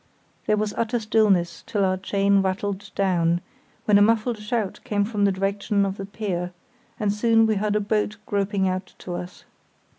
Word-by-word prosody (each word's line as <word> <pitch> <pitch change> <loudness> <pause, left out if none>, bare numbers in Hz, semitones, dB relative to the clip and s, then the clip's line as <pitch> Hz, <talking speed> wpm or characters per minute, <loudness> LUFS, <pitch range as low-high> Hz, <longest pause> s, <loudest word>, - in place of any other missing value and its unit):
There 215 0 +3
was 210 0 -1
utter 235 +1 0
stillness 210 -5 +2
till 200 -2 +1
our 185 0 +2
chain 200 +1 +2
rattled 195 +1 -2
down, 175 -3 +2 0.5
when 205 -1 +5
a - - +4
muffled 225 +2 +2
shout 210 -1 -2
came 205 -1 0
from 205 -2 0
the 200 - +4
direction 200 +1 0
of 195 0 -3
the 195 - -6
pier, 185 -4 -3 0.5
and 205 -2 +1
soon 225 +1 +4
we 220 - +2
heard 210 0 0
a - - +3
boat 210 0 -1
groping 200 -1 0
out 185 0 -3
to 180 - -7
us. 180 +1 -7
200 Hz, 180 wpm, -24 LUFS, 190-215 Hz, 0.5 s, when